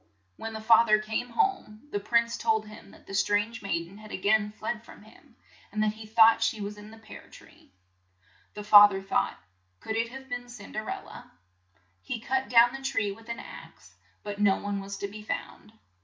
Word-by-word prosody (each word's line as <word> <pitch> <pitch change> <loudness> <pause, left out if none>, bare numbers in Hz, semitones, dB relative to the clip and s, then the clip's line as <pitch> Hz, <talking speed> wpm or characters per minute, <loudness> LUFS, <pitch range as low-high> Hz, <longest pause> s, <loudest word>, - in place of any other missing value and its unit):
When 225 - -7
the 220 - -6
fa 225 +1 +6
ther 215 0 +6
came 220 +3 -3
home, 235 - -1
the 205 - -1
prince 235 +3 +1
told 220 -1 0
him 215 0 -13
that - - -18
the - - -10
strange 205 +3 0
maid 170 -4 -2
en 195 +4 -14
had 215 0 -12
a - - -3
gain 210 +2 +2
fled 215 +1 -5
from - - -15
him, 235 +4 -20 0.4
and 215 +1 0
that 210 -1 +1
he 215 0 -11
thought 225 +1 +6
she 225 -1 0
was 205 0 -5
in 210 0 -12
the 225 - -13
pear 220 -1 -13
tree. - - -18 0.8
The 210 - -6
fa 205 0 +9
ther 195 -1 -5
thought, 245 +5 0 0.4
"Could 220 - -4
it 230 +1 0
have 265 +2 -10
been 245 -1 -6
Cin 230 -4 -11
der 215 0 -5
el - - -5
la? - - -11 0.4
" 95 - -43 0.3
He 105 - -5
cut 265 +3 -2
down 240 0 +6
the 270 - -7
tree 225 -6 -1
with 225 +3 -13
an 235 - -4
axe, - - -12 0.3
but 205 -1 -6
no 200 -2 +4
one 205 -1 -4
was 195 0 -7
to 200 - -4
be 210 +2 -10
found. 210 0 -6
215 Hz, 220 wpm, -28 LUFS, 205-230 Hz, 0.8 s, fa